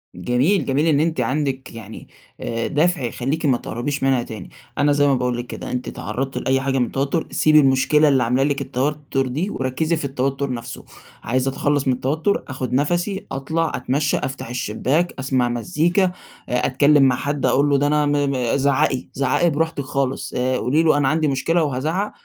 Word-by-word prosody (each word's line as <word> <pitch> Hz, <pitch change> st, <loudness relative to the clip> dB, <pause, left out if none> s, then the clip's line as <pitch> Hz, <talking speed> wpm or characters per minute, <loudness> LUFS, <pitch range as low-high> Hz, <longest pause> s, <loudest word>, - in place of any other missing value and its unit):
جميل، 125 Hz, -, +1 dB
جميل 140 Hz, +4 st, +1 dB
إن 145 Hz, -2 st, +3 dB
أنتِ 160 Hz, +1 st, 0 dB
عندك 135 Hz, -3 st, -2 dB
يعني 110 Hz, -1 st, -10 dB, 0.3 s
آآ 115 Hz, 0 st, -2 dB
دافع 165 Hz, +2 st, +1 dB
يخليكِ 135 Hz, +7 st, -2 dB
ما 130 Hz, -4 st, +3 dB
تقربيش 135 Hz, +5 st, -4 dB
منها 130 Hz, -3 st, +2 dB
تاني، 110 Hz, -6 st, -9 dB, 0.3 s
أنا 145 Hz, +1 st, +3 dB
زي 145 Hz, 0 st, +3 dB
ما 140 Hz, -, +3 dB
باقول 125 Hz, -1 st, -1 dB
لِك 120 Hz, 0 st, -5 dB
كده -, -, -7 dB
أنتِ 125 Hz, 0 st, -3 dB
اتعرضتِ 135 Hz, +1 st, -4 dB
لأي 135 Hz, 0 st, +1 dB
حاجة 135 Hz, 0 st, 0 dB
من 125 Hz, -, +2 dB
التوتر، 140 Hz, +6 st, -2 dB
سيبي 155 Hz, 0 st, +4 dB
المشكلة 145 Hz, +3 st, +4 dB
اللي 135 Hz, -3 st, +3 dB
عاملة 125 Hz, +3 st, +1 dB
لِك 140 Hz, -1 st, 0 dB
التوتر 135 Hz, +1 st, -1 dB
دي 155 Hz, +11 st, -2 dB
وركزي 130 Hz, +4 st, -1 dB
في 155 Hz, -, -4 dB
التوتر 135 Hz, 0 st, -2 dB
نفسُه، 120 Hz, +1 st, -7 dB, 0.4 s
عايزة 130 Hz, +3 st, 0 dB
أتخلص 145 Hz, 0 st, 0 dB
من 130 Hz, -, +3 dB
التوتر، 155 Hz, +10 st, -1 dB
آخد 130 Hz, -1 st, -4 dB
نفَسي، 175 Hz, +8 st, 0 dB
أطلع 160 Hz, +4 st, -1 dB
أتمشى، 145 Hz, +4 st, 0 dB
أفتح 135 Hz, -3 st, -5 dB
الشباك، 130 Hz, +8 st, -1 dB
أسمع 130 Hz, -2 st, +1 dB
مزيكا، 175 Hz, -, +1 dB, 0.4 s
أتكلم 140 Hz, +4 st, +3 dB
مع 130 Hz, -2 st, +4 dB
حد 145 Hz, +2 st, -2 dB
أقول 145 Hz, +2 st, +3 dB
له 140 Hz, -, +3 dB
ده 145 Hz, +1 st, +1 dB
أنا 150 Hz, 0 st, +2 dB
م 140 Hz, -4 st, 0 dB
زعَّقي، 135 Hz, -1 st, +1 dB
زعَّقي 140 Hz, +6 st, +1 dB
براحتِك 160 Hz, 0 st, -1 dB
خالص، 135 Hz, -1 st, -2 dB
آآ 130 Hz, +1 st, 0 dB
قولي 140 Hz, +8 st, +1 dB
له 155 Hz, -3 st, +4 dB
أنا 140 Hz, -, +2 dB
عندي 155 Hz, +2 st, +1 dB
مشكلة 155 Hz, +5 st, +1 dB
وهازعَّق، 155 Hz, +9 st, -1 dB
135 Hz, 180 wpm, -21 LUFS, 130-150 Hz, 0.4 s, سيبي